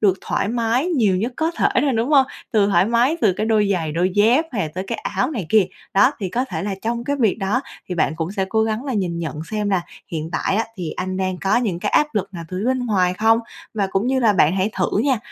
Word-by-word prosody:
được 190 -3 +3
thoải - - -1
mái 235 +5 0
nhiều 225 - +2
nhất 230 +7 -2
có 320 +1 0
thể 345 - +1
thôi, 280 -3 +2
đúng 230 +3 0
hông? 275 -3 +5 0.3
Từ 205 -2 +4
thoải 185 -2 +3
mái, 240 +7 +2
từ 205 - +4
cái 215 - -1
đôi 215 -2 +2
giày, 160 -4 -2
đôi 180 +3 +1
dép 230 +9 +4
hay 205 - -1
là 155 - -2
tới 185 +1 -3
cái 230 - -3
áo 255 - -1
này 210 - -4
kia. 210 -3 +4 0.3
Đó, 205 +8 +5
thì 190 - -2
có 245 +7 -1
thể 265 - -5
là 200 -1 -2
trong 235 +1 -2
cái 285 +1 -1
việc 225 -5 +1
đó 210 +5 0 0.3
thì 180 - -3
bạn 165 - +1
cũng 165 +3 -3
sẽ 195 -2 -1
cố 220 +1 +2
gắng 220 +4 -2
là 270 - -3
nhìn 180 -5 -1
nhận 155 -2 -4
xem 210 -2 -1
là 185 -2 +1 0.3
hiện 160 0 -3
tại 190 - 0
á 225 - +1
thì 175 -4 -4
anh 185 0 -4
đang 185 -1 -1
có 195 +4 +1
những 205 -8 0
cái - - -2
áp 300 - +4
lực 195 -1 -2
nào 170 - -6
từ 185 - -5
phía - - -3
bên 255 -1 0
ngoài 185 -4 +2
không? 225 +2 +3 0.4
Và 200 -2 0
cũng 195 +5 0
như 260 0 +1
là 225 -3 +4
bạn 175 -1 +3
hãy 195 +3 +1
thử 185 +2 0
nha, 260 0 +2
210 Hz, 280 wpm, -21 LUFS, 185-235 Hz, 0.4 s, hông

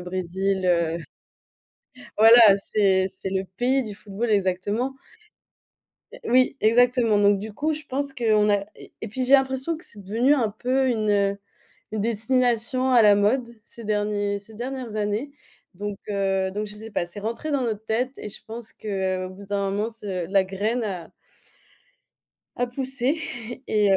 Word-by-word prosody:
Brésil 185 +1 -2
heu 170 -2 +2 1.2
voilà 225 +2 +9 0.2
c'est 195 -2 +2
c'est - - -5
le 190 0 -1
pays 260 +2 +2
du 215 -3 -7
football 210 +3 -4
exactement. 205 +6 0 1.2
Heu, - - -10
oui 255 +3 +3
exactement. 235 -1 +4
Donc 205 -1 +4
du 215 +2 -7
coup 305 +9 -1
je 305 0 -5
pense 275 +1 -2
qu'on 215 -5 +2
a 200 -1 +2
et - - -14
et 220 - -5
puis 255 +5 -2
j'ai 265 - +1
l'impression 265 +4 +2
que 335 - -12
c'est 205 - -11
devenu 230 +9 +2
un 230 -6 +1
peu 255 +5 0
une, 215 -3 0
heu, 200 -1 +2 0.5
une 215 -1 -2
destination 240 +3 +1
à 245 -2 +7
la 205 -1 +7
mode 235 +5 +2 0.2
ces 235 - -11
derniers 205 -1 -1
ces 205 +2 -16
dernières 245 -1 -5
années. 215 +7 -2 0.4
Donc 205 +2 -5
heu 195 -1 0
donc 210 +2 -3
je 210 - -9
sais 220 +1 -9
pas, 175 - -1
c'est 175 +4 -9
rentré 230 +9 -4
dans 280 - +1
notre 220 -3 -3
tête 250 +5 -1
et 210 - -6
je - - -12
pense 225 0 -8
que, 215 - -11
heu, 190 -2 -1
au 185 - -7
bout 195 +2 -11
d'un 200 0 -1
moment 205 +3 -1
ce 200 -6 -5
la 195 +2 +3
graine 210 +6 -2
a 185 -5 -5 1.5
a 245 - 0
poussé 265 +3 -1 0.5
et 210 -2 +3
heu 195 - +5
215 Hz, 175 wpm, -24 LUFS, 200-245 Hz, 1.5 s, voilà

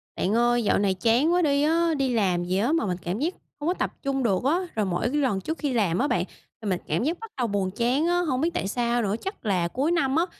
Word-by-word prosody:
Bạn 195 - 0
ơi, 240 0 +3
dạo - - +2
này 200 -1 +2
chán 235 - +2
quá 360 - +3
đi 285 -3 +2
á. 330 +2 +2
Đi 265 -2 0
làm 185 -6 +1
gì 180 +2 -1
á, 230 +8 +1
mà 330 -5 +1
mình 180 -3 -2
cảm 175 +5 -3
giác 325 +6 0 0.3
hông 295 - -3
có 350 - +3
tập - - -2
trung 270 -1 -1
được 200 -2 +1
á. 315 +7 +2 0.2
Rồi, 215 -2 +1
mỗi 180 +4 -1
cái 295 - -1
lần 205 -8 0
trước 320 - -4
khi 285 -4 -2
làm 195 -7 +1
á 280 - +2
bạn, - - +1 0.4
thì 215 - -3
mình 185 -2 0
cảm 160 +9 0
giác 330 +5 -1
bắt 450 -1 -9
đầu 245 -2 0
buồn 200 -3 -1
chán 245 - +1
á, 350 0 +2
hông 270 -7 -1
biết 330 - +2
tại 345 - -2
sao 240 +2 0
nữa, 205 -2 0
chắc 390 - -6
là 185 -5 +1
cuối 270 - -1
năm 275 -6 +1
á, 330 +2 +3
245 Hz, 290 wpm, -25 LUFS, 200-305 Hz, 0.4 s, ơi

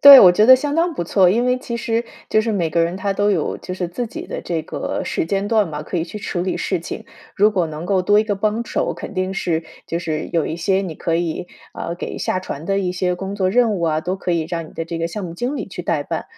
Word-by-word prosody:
对， 280 -1 +12
我 180 -5 +9
觉 210 +5 +4
得 260 0 +10
相 290 +2 -2
当 335 +1 +2
不 175 - -2
错。 185 +1 +4
因 230 +6 +2
为 250 0 +3
其 235 -2 -4
实 230 0 -1 0.2
就 215 - +4
是 225 - -1
每 175 -7 0
个 170 +1 +2
人 170 +2 -1
他 200 +1 -1
都 205 +1 +2
有 170 -6 0
就 185 - -6
是 180 -1 -2
自 230 +8 -4
己 - - -7
的 - - -5
这 165 -2 -2
个 - - -3
时 - - -1
间 195 +2 0
段 215 -4 +2
嘛， 150 -1 -5
可 175 - -4
以 165 - 0
去 210 +5 -7
处 190 -4 -3
理 185 +1 -1
事 185 -4 -1
情。 - - -6 0.3
如 210 +2 +5
果 185 -5 +1
能 155 +2 -6
够 190 0 +2
多 205 +3 +4
一 215 - +3
个 205 -2 0
帮 215 +3 0
手， - - -1
肯 - - -7
定 185 0 -1
是 165 -4 0 0.2
就 170 - -2
是 155 -3 -3
有 165 -3 +1
一 160 - -3
些 190 +3 +1
你 180 -5 -4
可 165 +2 -1
以， 175 +1 -1 0.3
呃， 170 - -4
给 175 - -5
下 185 - -1
传 155 -4 -6
的 195 +1 +1
一 185 -2 0
些 180 0 0
工 195 +2 -5
作 185 -2 +1
任 235 0 +3
务 180 -4 -2
啊， 155 -1 +1
都 185 +4 -2
可 180 -2 -2
以 160 -2 0
让 165 -2 -3
你 - - -15
的 165 - -4
这 165 0 -5
个 165 - 0
项 190 +3 -5
目 170 -1 -6
经 250 +9 -2
理 - - -4
去 - - -6
代 - - 0
办。 - - -4
185 Hz, 310 characters per minute, -20 LUFS, 170-210 Hz, 0.3 s, 对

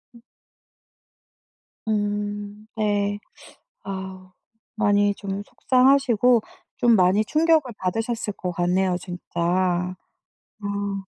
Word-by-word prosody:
음. 235 - -15 1.7
음. 205 0 -2
네. 205 -1 0 0.7
아우 190 -1 -7 0.4
많이 205 -1 +3
좀 200 0 -4
속상하시고 250 -2 +3 0.4
좀 240 -1 +4
많이 190 +2 +3
충격을 310 -2 +2
받으셨을 225 +3 -2
것 180 -2 -4
같네요, 180 +1 +1
진짜. 180 -2 -7 1.4
아. 200 -1 -3
205 Hz, 160 characters per minute, -24 LUFS, 195-225 Hz, 1.7 s, 좀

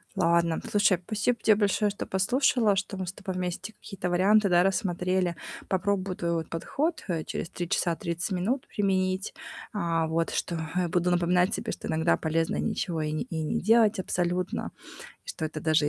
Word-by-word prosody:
Ладно, 170 -2 +2
слушай, 205 -2 +4
спасибо 215 +4 0
тебе 215 - +6
большое, 205 0 +2
что 200 - -5
послушала, 225 +2 +2
что 195 0 -3
мы 185 - -3
с 180 - -5
тобой 190 -1 -6
вместе 185 +3 -4
какие-то 190 -4 -5
варианты, 200 +4 +4
да, 175 0 +5
рассмотрели. 185 -2 0 0.3
Попробую 190 0 0
твой, 170 0 -1
вот, 165 -1 -2
подход, 295 - -2
э, 165 -4 -1
через 165 - -4
3 175 -1 -5
часа 170 -2 +1
30 170 +4 -3
минут 205 +9 -1
применить, 190 -1 0 0.4
а, 170 -5 0
вот 165 +1 0
что, 175 - -2 0.2
э, 180 -1 +1
буду 175 +1 +1
напоминать 180 +2 +3
себе, - - -3
что - - -6
иногда 160 +1 +2
полезно 165 +1 0
ничего 165 -3 -1
и 150 0 -1
не 155 - -1
и 165 -10 -4
не 155 - -1
делать 220 0 +4
абсолютно, 180 0 -1 0.5
и - - -19
что - - -4
это 155 0 -6
даже 155 -1 +3
180 Hz, 180 wpm, -27 LUFS, 170-200 Hz, 0.5 s, тебе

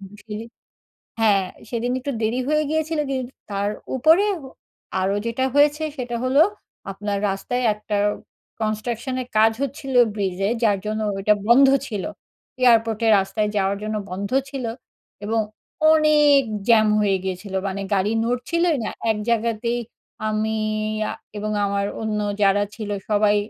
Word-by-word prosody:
Eventually 210 +3 -9 0.7
হ্যাঁ, 205 -4 +4 0.3
সেদিন 240 +1 -2
একটু 280 +2 -4
দেরি 225 +4 0
হয়ে 305 0 +2
গিয়েছিলো 315 0 0
দি 270 - -1 0.4
তার 200 0 0 0.3
উপরে 320 +9 +5 0.2
হ 270 - -10 0.6
আরও 195 +2 +1
যেটা 230 +3 -1
হয়েছে 295 +2 +4
সেটা 245 -2 -3
হল, 255 +1 0 0.6
আপনার 200 +1 -3
রাস্তায় 245 +6 -2
একটা 210 0 -5 0.7
কনস্ট্রাকশনের 235 +4 -2
কাজ 220 +1 +6
হচ্ছিল 270 0 -4 0.2
ব্রিজে 195 0 -1
যার 205 -3 +4
জন্য 215 +1 -2 0.2
ওটা 210 +2 +4
বন্ধ 265 +3 +7 0.2
ছিল। 205 -5 -4 0.6
এয়ারপোর্টের 225 -2 +4
রাস্তায় 195 +2 -1
যাওয়ার 195 0 +1
জন্য 215 0 -2
বন্ধ 195 +2 -4 0.2
ছিল 270 -4 -4 0.6
এবং 225 +1 0 0.5
অনেক 300 -2 +5 0.3
জ্যাম 220 -2 +6
হয়ে 195 -2 +2
গিয়েছিলো 190 +1 -4
মানে 195 +1 -3
গাড়ি 200 +2 +1
নড়ছিলই 310 +8 +1
না, - - -2 0.2
এক 215 - -2
জায়গাতেই 235 +1 0 0.5
আমি 215 0 0 0.6
আ - - -2 0.3
এবং 215 +1 -3
আমার 200 0 0 0.2
অন্য 215 -1 -1 0.2
যারা 200 0 +4
ছিল 215 -2 -6 0.2
সবাই 210 0 +3
220 Hz, 135 wpm, -22 LUFS, 205-250 Hz, 0.7 s, বন্ধ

